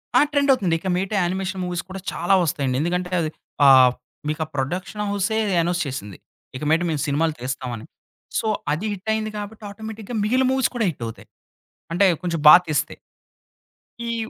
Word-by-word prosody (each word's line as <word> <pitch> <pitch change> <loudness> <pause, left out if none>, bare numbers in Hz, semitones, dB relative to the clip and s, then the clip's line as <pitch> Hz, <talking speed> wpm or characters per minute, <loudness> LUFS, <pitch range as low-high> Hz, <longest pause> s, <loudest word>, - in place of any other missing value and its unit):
ఆ! - - +8
ట్రెండ్ 285 -1 +2
అవుతుంది. 185 -10 +1
ఇక 190 - -6
మీదట 190 +3 -2
యానిమేషన్ 185 +1 -2
మూవీస్ 180 -1 -3
కూడా 190 +1 -6
చాలా 175 +3 0
వస్తాయండి. 145 -6 -1
ఎందుకంటే 180 +2 -1
అది 155 - -1 0.4
ఆహ్, 130 -2 +8 0.4
మీకా 155 +1 -1
ప్రొడక్షన్ 180 +10 -3
హౌసే 205 +2 0 0.2
అనౌన్స్ 175 +1 0
చేసింది. 105 -8 -6 0.4
ఇక 130 - -6
మీదట 165 +3 +3
మేము 150 -3 -1
సినిమాలు 155 +3 +1
తీస్తామని. 125 -3 -4 0.5
సో 225 - -2 0.2
అది 160 +8 -2
హిట్టయింది 215 +2 -2
కాబట్టి 210 +1 -7
ఆటోమేటిక్‌గా 220 +2 -7
మిగిలిన 255 +5 +2
మూవీస్ 265 -1 +2
కూడా 230 -3 +1
హిట్టవుతయి. 115 -8 -7 0.7
అంటే, 195 +3 +4 0.2
కొంచెం 170 -2 -2
బా 150 - +12
తీస్తే. 155 0 -1 1.1
ఈవ్ 230 -1 -3
180 Hz, 155 wpm, -22 LUFS, 150-210 Hz, 1.1 s, బా